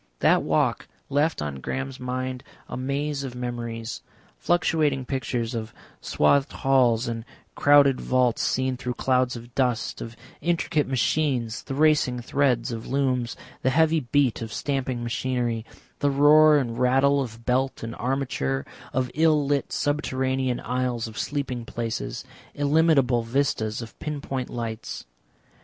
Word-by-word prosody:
That - - +5
walk - - 0 0.2
left 145 - +1
on 70 -2 -4
Graham's 135 - -4
mind 130 0 -3 0.2
a - - -6
maze 140 +2 -2
of 130 -2 -6
memories, 120 -2 -5 0.4
fluctuating 155 -6 +1
pictures 125 -3 -2
of 110 -1 -5 0.3
swathed 135 - +2
halls, 125 -4 +2
and 115 -1 -3 0.3
crowded 145 -2 +5
vaults 125 -2 +2
seen 130 0 0
through 125 -1 -4
clouds 130 -1 +1
of 120 0 -10
dust, 125 -3 0
of 115 0 -7 0.3
intricate 165 -3 0
machines, 130 -3 0
the 135 - -6
racing 145 -4 +3
threads 125 -1 +1
of 115 -1 -5
looms, 130 -3 0 0.3
the 130 - +2
heavy 160 +3 +3
beat 135 -2 +1
of 115 -1 -5
stamping 130 -3 -2
machinery, 120 -1 -2 0.3
the 145 - +2
roar 150 +2 +6
and 120 -4 -2
rattle 135 +3 +3
of 115 -2 -7
belt 130 +1 0
and 115 0 -4
armature, 120 - -1 0.3
of 130 -1 0
ill 155 -1 +3
lit 140 0 0
subterranean 130 -3 0
aisles 125 -2 -1
of 110 - -8
sleeping 135 -4 -3
places, 115 -1 -4 0.3
illimitable 145 -4 +3
vistas 115 -2 -1
of 115 - -12
pin 150 -2 -4
point 130 -2 -4
lights. 115 -1 -5
130 Hz, 140 wpm, -25 LUFS, 120-140 Hz, 0.4 s, roar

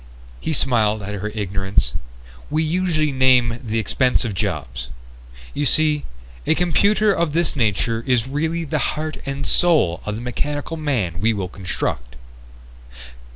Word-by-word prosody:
He - - -3
smiled 110 -7 +2
at 100 +1 -5
her 105 +1 -3
ignorance. 95 -1 0 0.6
"We 155 +2 +1
usually 160 -2 +1
name 125 -3 +4
the 115 -2 -2
expensive 120 +1 +1
jobs. 75 - -3 0.7
You 145 -1 0
see, 150 0 +2 0.4
a - - +4
computer 200 +5 +3
of 170 -4 0
this 170 0 +1
nature 115 -1 0
is 125 -2 +2
really 160 +4 -1
the 155 0 -1 0.2
heart 155 0 -3
and 140 0 -3
soul 155 - +3
of 105 - -3
the 115 - -5
mechanical 145 +5 -3
man 120 - -1
we 110 +2 +3
will 95 -4 -3
construct." 65 -10 -4
125 Hz, 140 wpm, -21 LUFS, 105-155 Hz, 0.7 s, name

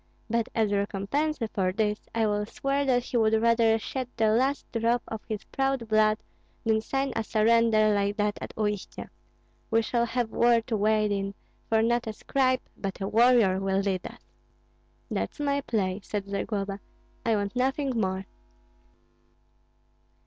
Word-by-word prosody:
But 235 -1 0
as 220 -3 +2
recompense 205 +10 -1 0.2
for 185 -2 +1
this, 210 +1 -2
I 225 -1 +2
will 210 0 0
swear 275 +4 -1
that 245 -2 +2
he 245 - -2
would 220 -1 +3
rather 230 -1 +4
shed 255 +3 -4
the 220 -2 +3
last 260 +6 +1
drop 230 +1 +1
of 220 -1 -5
his 215 -2 -3
proud 270 -3 -1
blood 215 0 +3 0.5
than 220 -1 +2
sign 270 +4 -2
a 225 - 0
surrender 220 -1 +3
like 200 +1 0
that 210 0 0
at - - -6
Uistsie. 210 -2 -3 0.6
We 225 0 +3
shall 235 +1 0
have 235 -1 -1
war 235 0 +4
to 225 0 -3
wade 215 0 +2
in; 195 0 -2 0.3
for 220 0 +3
not 235 0 +1
a 220 - -3
scribe, 255 +3 +1
but 195 -1 -5
a 195 - -2
warrior, 225 -4 +4
will 195 0 +1
lead 190 -2 -2
us." - - -16 0.8
"That's - - -3
my 280 -1 0
play," 200 -7 -1
said 200 0 -4
Zagloba, 200 0 -3 0.4
"I 225 - +2
want 200 +2 -2
nothing 270 +2 0
more. 190 -5 -1
220 Hz, 160 wpm, -27 LUFS, 205-240 Hz, 0.8 s, rather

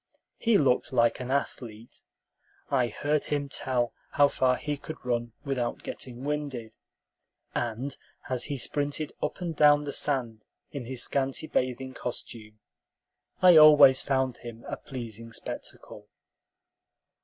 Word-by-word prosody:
He 230 -3 +4
looked 135 -6 +2
like 120 -1 +3
an 125 0 -5
athlete; 120 -4 -4 0.7
I 130 -3 +3
heard 145 +6 -1
him 145 -1 -2
tell 125 -4 -1 0.2
how 145 0 +5
far 130 -2 +2
he 150 +2 -3
could 155 +2 -8
run 120 -2 -1
without 125 -4 -2
getting 125 0 -7
"winded;" 140 -6 -3 0.8
and 120 +4 -3 0.3
as 125 -2 -2
he 140 - -3
sprinted 145 +3 -2
up - - -3
and 170 -2 -3
down 145 0 +5
the 145 -1 -4
sand 120 -7 -1 0.3
in 140 -4 -6
his 125 0 -1
scanty 135 +2 0
bathing 130 -2 -2
costume, 110 -4 -7 0.9
I 180 -3 +9
always 150 -4 +8
found 130 -2 0
him 115 -1 -10
a - - -3
pleasing 115 -3 -8
spectacle. - - -7
130 Hz, 130 wpm, -28 LUFS, 120-145 Hz, 0.9 s, I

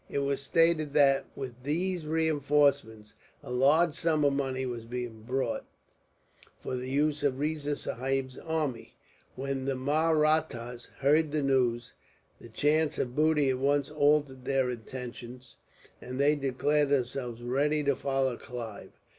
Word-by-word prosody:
It - - -3
was 140 0 0
stated 155 0 +2
that, 135 -2 +4
with 125 -3 -7
these 170 +4 -2
reinforcements, 145 -8 +1 0.3
a - - -8
large 145 +6 +4
sum 155 -2 +1
of 140 - +3
money 130 -1 -2
was 120 -2 -5
being 120 -2 -6
brought, 125 +1 -2 0.9
for - - -5
the 125 +1 -4
use 145 +2 +1
of 140 -2 0
Riza 150 -1 -1
Sahib's 130 0 -2
army. 155 -7 -3 0.4
When 135 0 -3
the 135 -1 -1
Mahrattas 150 -4 0
heard 150 +2 +3
the 150 -1 0
news, 125 -3 +1 0.5
the 120 - -13
chance 150 +6 +1
of 125 0 -2
booty 150 -3 +3
at 130 - -2
once 140 +1 +1
altered 145 -3 +1
their 135 -2 +1
intentions, 125 +1 -8 0.4
and 130 +1 -6
they 145 +2 +4
declared 145 +1 +1
themselves 125 -3 -2
ready 145 +5 +1
to 140 -1 +2
follow 135 -3 -1
Clive. 115 -4 -8
140 Hz, 140 wpm, -29 LUFS, 125-150 Hz, 0.9 s, that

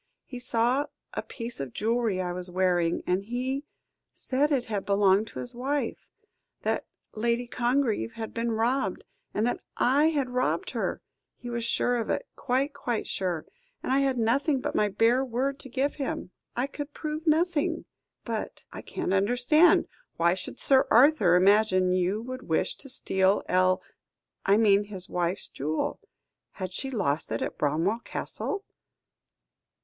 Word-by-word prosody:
"He 250 - -8
saw 245 +3 +1 0.3
a - - -2
piece 235 -1 -6
of 135 -4 -5
jewellery 225 -3 0
I 180 -1 -2
was 180 0 -2
wearing, 175 -2 +1
and 180 +2 +1
he 255 +6 -3 0.5
said 280 +3 0
it 260 -4 +1
had 210 -4 -2
belonged 200 +1 +3
to - - -8
his 245 - -4
wife 275 +4 -2 0.6
that - - -1 0.3
Lady 235 +2 0
Congreve 240 - 0
had 225 -1 -6
been 230 0 -1
robbed, 240 +5 0 0.3
and 215 - 0
that 245 - 0 0.2
I 280 +5 +4
had 280 -5 -1
robbed 250 +1 0
her. - - -2 0.3
He 245 - -8
was 235 -1 -2
sure 245 +1 +1
of 230 - -3
it, - - -1
quite, 270 +3 0
quite 240 -5 -2
sure, 180 -4 -2 0.4
and - - -2
I 270 - +4
had 270 -2 +1
nothing 265 +5 +2
but - - -3
my 210 - +3
bare 230 +6 +3
word 265 +3 -1
to 265 - -8
give 270 +3 0
him; 270 -9 -4 0.2
I 245 - +1
could 285 +1 -7
prove 310 +1 -4
nothing." 320 0 +2 0.4
"But - - -4
I - - -6
can't - - -3
understand. 245 - +4 0.3
Why 170 +1 +4
should 190 - -7
Sir 265 -1 +4
Arthur 240 - +6
imagine 185 -1 +4
you 185 +4 +1
would 255 +1 -7
wish 160 - +1
to 275 - -10
steal 190 -6 +2
El 185 0 +3 0.6
I 200 +1 +6
mean 205 -2 +4
his 190 -3 -4
wife's 175 +1 -1
jewel. 155 +3 -2 0.5
Had 185 -2 -5
she 270 +7 -3
lost 180 - -1
it 115 - -1
at - - -5
Bramwell 165 +10 +1
Castle?" 405 - -4
235 Hz, 160 wpm, -28 LUFS, 190-265 Hz, 0.6 s, Arthur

